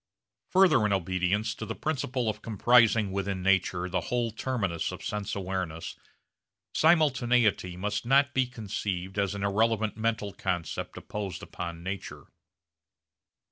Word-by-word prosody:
Further 185 - +5
in 100 - +1
obedience 95 +3 0
to - - -7
the 110 +1 -4
principle 130 -5 -2
of 105 0 -2
comprising 115 -1 +4
within 95 -1 -2
nature 95 -2 +2
the 95 +1 -1
whole 120 -1 0
terminus 105 -8 -2
of - - -8
sense 105 -2 -3
awareness, 95 -4 -4 0.8
simultaneity 125 - +3
must 105 +3 -2
not 140 +3 +3
be 130 -1 +2
conceived 100 -5 -4
as 100 0 0
an 100 - -4
irrelevant 110 +1 +1
mental 110 -3 -1
concept 90 -3 -3
imposed 100 -5 -5
upon 85 -1 -6
nature. 95 +2 -6
105 Hz, 130 wpm, -28 LUFS, 95-120 Hz, 0.8 s, Further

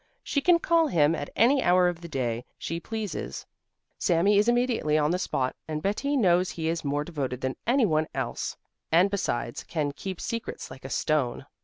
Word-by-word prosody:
She 280 - 0
can 350 +4 +5
call 335 -1 +3
him 155 - +3
at 145 -3 -4
any 260 +4 +4
hour 180 -2 +4
of 175 -1 -2
the 170 - -7
day 120 -6 -2
she 165 +1 -4
pleases, 220 +1 -5 0.5
Sami 195 +3 +3
is 210 - +2
immediately 240 -11 +2
on 150 +1 +2
the 180 - 0
spot, 130 -7 -1
and 155 -1 -4
Betti 280 +9 0
knows 180 -5 +3
he 160 -1 -2
is 165 0 -2
more 145 0 0
devoted 140 -6 -4
than 130 0 -2
any 250 0 +4
one 155 -4 +1
else - - -3 0.3
and 180 +5 +5
besides 120 -11 -2
can 150 -4 -2
keep 185 +5 -6
secrets 230 - -5
like 130 0 -11
a - - -5
stone. 140 -4 0
170 Hz, 190 wpm, -27 LUFS, 150-215 Hz, 0.5 s, can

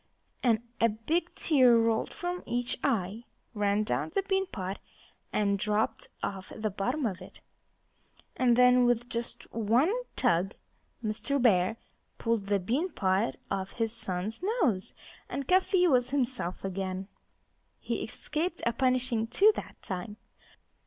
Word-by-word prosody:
And 235 -3 +2 0.2
a 230 - +5
big 230 +11 -2
tear 255 -7 +5
rolled 225 -1 +1
from 355 0 -4
each 245 0 -1
eye, 220 -3 0 0.3
ran 205 -1 +1
down 215 - -1
the 395 - +2
bean 385 0 0
pot, 190 - -5 0.5
and 200 -1 +1
dropped 210 +2 0 0.2
off 190 -1 -4
the 215 -1 -2
bottom 250 +9 -1
of 190 -4 -2
it. 185 - -12 1.0
And 245 -2 +4
then, 250 0 +6
with 240 0 +1
just 235 -2 -3
one 230 - +3 0.2
tug 195 -5 +1 0.5
Mr. 225 +6 -1
Bear 215 -3 +3 0.4
pulled 230 -4 0
the 205 0 +3
bean 255 - 0
pot 190 - +1 0.2
off 195 -1 -2
his 225 -1 -1
son's 205 - -2
nose; 345 - 0 0.3
and 280 -1 -4
Cuffy 370 0 +4
was 250 -5 +3
himself 250 -10 -2
again. 190 0 -3 0.7
He - - -3
escaped 330 +3 -3
a 235 - +2
punishing, 255 -2 +1
too, 410 - +5
that - - -8
time. 195 +2 -5
230 Hz, 140 wpm, -29 LUFS, 200-260 Hz, 1.0 s, then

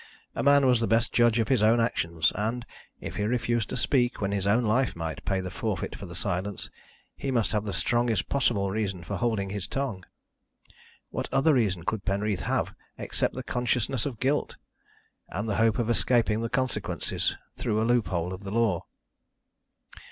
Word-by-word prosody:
A - - -2
man 140 0 +5
was 125 -2 +4
the 115 - 0
best 115 +1 +2
judge 120 -1 +4
of 115 +1 +1
his 130 -5 +3
own 110 +2 +5
actions 85 -8 +1
and, 115 +4 -2 0.3
if - - -6
he 105 - 0
refused 120 -1 0
to - - -3
speak 125 -3 +2
when 100 -1 -1
his 100 -1 -1
own 110 +5 +3
life 120 +4 +2
might 80 -3 -4
pay 95 -1 0
the 90 -1 -5
forfeit - - -3
for 95 -2 -8
silence, 95 +1 -3 0.4
he 135 - -4
must 120 -5 +1
have 105 -1 0
the 100 - -2
strongest 120 +4 +1
possible 110 -8 +1
reason 100 -4 -2
for - - -4
holding 110 -5 0
his 100 -2 -3
tongue. 130 -9 -3 1.1
What - - -4
other 140 +4 +4
reason 100 -9 +1
could 105 +2 -2
Penreath 100 0 0
have - - 0 0.2
except - - -1
the - - -4
consciousness 125 0 0
of 120 -6 -6
guilt, 140 +3 0 0.7
and 105 +5 -3
the 100 - 0
hope 110 -1 +3
of 120 - 0
escaping 115 -2 +2
the 115 - -2
consequences 130 +1 -1 0.2
through 105 - -1
a 110 - +2
loop 120 -4 +2
hole 90 0 -2
of 95 +2 -8
the 100 - -5
law? 105 -5 +1
110 Hz, 185 wpm, -27 LUFS, 100-120 Hz, 1.1 s, man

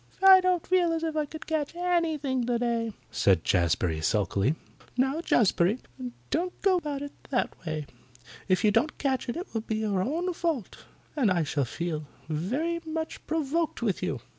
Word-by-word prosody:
"I 380 -1 +10
don't 365 -2 +1
feel 355 -2 +3
as 325 0 -2
if 320 -1 -1
I 305 -1 0
could 315 +2 -9
catch 315 0 -2
anything 320 -7 0
today," 235 -2 0 0.2
said 95 -4 +3
Jazbury 85 -2 +1
sulkily. 105 - +1 0.4
"Now, 265 +5 +2
Jazbury, 205 - +3 0.5
don't 360 +3 -1
go 385 -2 +5
about 290 -4 -3
it 285 - -6 0.2
that 250 - 0
way. 155 -1 -2 0.6
If 185 -2 +2
you 210 - +5
don't 235 +8 +1
catch 265 -3 -1
it, 240 - -2
it 360 - -6
will 225 - -1
be 220 0 -3
your 210 -3 0
own 335 - -1
fault, 330 - -3 0.3
and 260 -8 +3
I 175 -3 +2
shall 145 -2 0
feel 155 +2 -4 0.2
very 260 - -1
much 320 0 -4
provoked 320 -2 -1
with 205 -6 0
you." - - -2
265 Hz, 170 wpm, -28 LUFS, -, 0.6 s, I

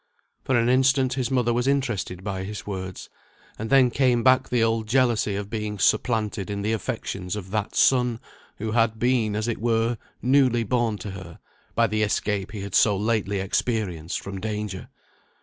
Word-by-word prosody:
For 130 - +1
an 115 0 +2
instant 130 +1 +3
his 125 -2 -1
mother 125 -3 +1
was 125 +2 0
interested 115 -10 -1
by 95 -2 -3
his 105 +2 -6
words; 95 -2 -6 0.5
and 110 +1 -4
then 130 -3 +5
came 125 -2 +2
back 130 0 +4
the 120 -2 +2
old 115 -1 0
jealousy 120 -4 +2
of 100 0 -5
being 105 -2 -3
supplanted 105 -1 +1
in 100 0 -3
the 110 +2 0
affections 95 -2 -4
of 95 -3 -7
that 105 -1 -2
son, 125 -3 +3 0.4
who 110 +1 -3
had 115 -1 +2
been, 115 -3 +1
as 110 +2 -1
it 120 - -2
were, 115 0 +1 0.2
newly 130 -2 +3
born 115 -1 0
to 100 +1 -7
her, 95 -3 -9 0.4
by - - +4
the 110 0 -1
escape 105 -1 -1
he 105 -3 -6
had 100 -1 -7
so 105 -3 +4
lately 105 -2 0
experienced 95 -4 -2
from 95 -1 -7
danger. 105 -3 -4
110 Hz, 180 wpm, -24 LUFS, 100-120 Hz, 0.5 s, then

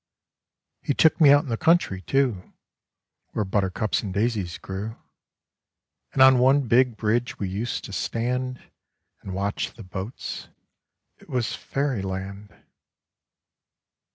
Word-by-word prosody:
He 145 - -1
took 160 +1 +4
me 150 - +8
out 145 +1 +6
in 145 - -8
the 115 - -1
country, 160 - +2
too, 120 -3 0 0.8
Where 105 - -1
buttercups 95 +2 0
and 100 - -5
daisies 100 -4 -1
grew; 100 +4 -6 1.2
And 130 - +5
on 130 -1 +7
one 135 +1 +4
big 120 0 +3
bridge 120 +3 0
we 100 - -2
used 105 +6 -3
to 100 - -8
stand 125 +4 -2 0.6
And 95 - -6
watch 100 +1 -2
the 115 - -10
boats 95 +5 -6 0.4
— - - -55
it - - -19
was 125 -3 -1
Fairyland. 100 -7 -3
115 Hz, 125 wpm, -25 LUFS, 100-130 Hz, 1.2 s, me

